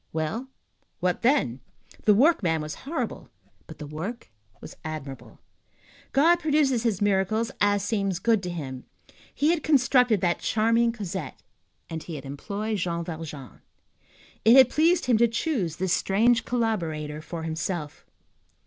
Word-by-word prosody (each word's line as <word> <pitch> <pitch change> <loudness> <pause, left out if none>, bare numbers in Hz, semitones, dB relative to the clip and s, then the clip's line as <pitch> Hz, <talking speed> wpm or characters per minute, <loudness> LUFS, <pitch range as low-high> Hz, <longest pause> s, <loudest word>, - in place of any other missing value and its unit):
Well, 160 +11 -3 0.5
what 180 0 0
then? 140 - +2 0.5
The 210 - +6
workman 210 - +3
was 150 0 -5 0.2
horrible; 330 - -4 0.4
but - - -11
the 150 - -7
work 160 - -6 0.3
was - - -11
admirable. 150 -4 -7 0.7
God 330 +5 +5
produces 295 -6 +2
his 220 -4 0
miracles 205 +3 +1
as 205 -1 +3
seems 195 -5 -1
good 220 +2 +2
to 180 - -5
him. 135 -7 -6 0.5
He 300 +3 +2
had 340 -2 0
constructed 250 -6 +3
that 175 -2 +1
charming 230 +2 +2
Cosette, 205 -7 -6 0.5
and 160 -1 -5
he 165 - -7
had 140 -2 -8
employed 200 +10 -4
Jean 170 -1 -2
Valjean. 155 - -8 0.8
It 225 +3 +7
had 260 -2 +7
pleased 335 +3 +3
him 240 -3 +3
to 235 - +5
choose 230 - -2
this 185 +1 0
strange 225 +5 +2
collaborator 165 -11 -2
for 165 0 -7
himself. 160 -1 -4
200 Hz, 140 wpm, -26 LUFS, 160-235 Hz, 0.8 s, It